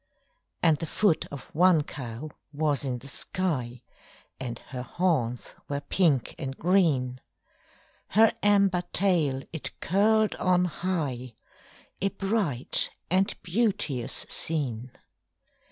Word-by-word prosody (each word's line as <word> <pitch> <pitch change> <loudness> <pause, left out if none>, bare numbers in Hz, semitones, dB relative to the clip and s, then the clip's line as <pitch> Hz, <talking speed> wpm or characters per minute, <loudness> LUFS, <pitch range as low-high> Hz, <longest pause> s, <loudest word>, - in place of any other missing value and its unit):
And 160 -3 +5
the 165 - -4
foot 200 0 +2
of 140 -2 -10
one 175 -1 +5
cow 135 +1 -7 0.2
was 145 -2 +1
in 130 -3 -2
the 130 - -11
sky, 130 -8 -1 0.6
And 120 -3 -4 0.2
her 125 - -3
horns 125 -4 -1 0.2
were 140 0 -1
pink 150 -7 +1
and 135 0 -5
green; 150 -9 +2 0.9
Her 220 +3 +5
amber 200 -3 +4
tail 160 -9 +2
it 160 - -4
curled 215 +4 +3
on 180 0 +3
high 150 -9 -3 0.7
A 195 - +2
bright 195 - 0 0.2
and 190 +2 +2
beauteous 180 - -1
scene. 130 -7 -2
155 Hz, 110 wpm, -27 LUFS, 130-185 Hz, 0.9 s, And